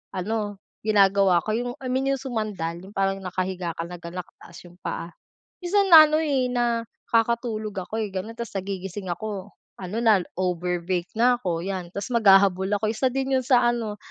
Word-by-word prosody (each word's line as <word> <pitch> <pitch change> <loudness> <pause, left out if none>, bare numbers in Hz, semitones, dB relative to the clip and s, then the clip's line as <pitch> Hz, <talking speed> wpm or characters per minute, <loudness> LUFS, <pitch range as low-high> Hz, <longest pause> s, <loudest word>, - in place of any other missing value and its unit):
ano 205 +1 -2 0.3
ginagawa 195 -3 +4
ko 215 - -1
yung, 245 +1 -2
I 255 - -5
mean 265 +1 0
yung 270 - -3
sumandal, 210 -9 -3
yung 200 - -13
parang 195 0 0
nakahiga 185 -1 -3
ka 165 - -2
lang 175 -1 -9
na 170 +2 -6
nakataas 170 -1 -16
'yong 175 0 -15
paa. 170 - -4 0.5
Minsan 395 +2 +2
na 315 -1 +12
ano, 305 +1 +2
eh, 270 -5 +1
nakakatulog 230 -2 -1
ako, 220 - -5
eh, 210 - -3
gano'n, 215 +5 -5
tapos 235 -3 -6
nagigising 190 0 -6
ako 205 0 -6 0.3
ano 185 +4 -5
na 215 -5 +5 0.2
overbreak 180 0 -1
na 245 +1 +5
ako 170 -6 -2
'yan 185 -2 -4
tapos 200 +5 -5
maghahabol 195 -3 +5
ako. 215 - -1
Isa 230 +4 +1
din 270 0 -1
'yon 260 - 0
sa 255 -3 +4
ano 225 -3 -3
205 Hz, 180 wpm, -24 LUFS, 185-235 Hz, 0.5 s, na